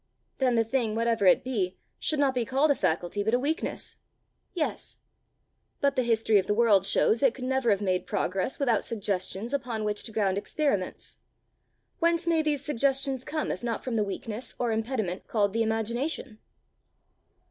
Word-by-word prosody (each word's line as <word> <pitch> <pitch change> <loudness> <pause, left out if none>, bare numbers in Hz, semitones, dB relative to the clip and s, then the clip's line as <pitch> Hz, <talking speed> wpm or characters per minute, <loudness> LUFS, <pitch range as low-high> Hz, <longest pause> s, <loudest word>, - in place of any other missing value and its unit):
"Then 255 -3 +2
the 230 - +4
thing, 225 -2 -1
whatever 230 -3 +2
it - - +5
be, 200 -8 -2 0.2
should 310 - 0
not 280 -2 +3
be 250 -2 0
called 270 +6 +2
a - - +3
faculty, 175 +2 0
but 220 +3 +2
a - - +2
weakness!" 300 +5 -2 0.6
"Yes." 320 -4 -2 0.8
"But 280 -1 +2
the 260 - +2
history 225 -3 +3
of 190 - -3
the 205 - +1
world 210 -4 +4
shows 225 - +3
it 265 -4 +3
could 260 - -8
never 265 -2 +1
have 200 -1 +2
made 185 -2 0
progress 190 +7 -1
without 245 -6 +1
suggestions 200 +1 -3
upon 240 -5 -2
which 210 0 -1
to 225 - -6
ground 200 -3 +1
experiments: 205 -6 -2 0.8
whence 335 0 +2
may 335 -2 +3
these 295 -3 -1
suggestions 270 -1 +1
come 310 +2 -2
if - - -4
not 235 -2 -3
from 250 -3 -3
the 215 - +2
weakness 210 +4 -5
or 240 -2 0
impediment 220 -5 -2
called 205 -3 +1
the 230 - +1
imagination?" 225 +2 -2
230 Hz, 175 wpm, -28 LUFS, 210-270 Hz, 0.8 s, it